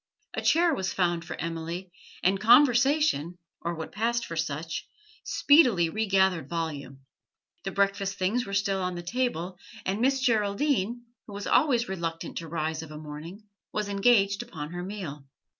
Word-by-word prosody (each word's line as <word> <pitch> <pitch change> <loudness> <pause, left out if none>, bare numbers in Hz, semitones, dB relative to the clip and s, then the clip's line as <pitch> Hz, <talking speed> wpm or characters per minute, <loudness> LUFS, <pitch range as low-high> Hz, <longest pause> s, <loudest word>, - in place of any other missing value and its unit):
A - - -2
chair 335 +1 +4
was 190 -8 -2
found 175 -2 0
for 170 - -7
Emily, 170 +2 -4 0.3
and 190 +2 +3
conversation, 245 - +4 0.2
or 170 0 -2
what 160 -1 -6
passed 230 +3 0
for 165 - -6
such, 160 0 -3 0.4
speedily 245 - +4
regathered 190 -7 +1
volume. 145 -5 -4 0.6
The 195 - -2
breakfast 200 0 0
things 205 +7 +1
were 200 - -3
still 200 -1 +1
on 180 -1 -2
the 175 - -6
table, 185 -4 -2 0.3
and 195 +4 -1
Miss 270 +2 +3
Geraldine, 235 0 +1 0.2
who 210 - -9
was 200 0 -5
always 250 -4 +3
reluctant 165 -3 -4
to 165 - -8
rise 160 0 -2
of 160 - -9
a 155 - -8
morning, 155 +7 -9 0.3
was 210 -1 -2
engaged 200 0 +3
upon 160 -10 -7
her 175 0 -5
meal. 180 -7 -6
190 Hz, 160 wpm, -27 LUFS, 165-230 Hz, 0.6 s, chair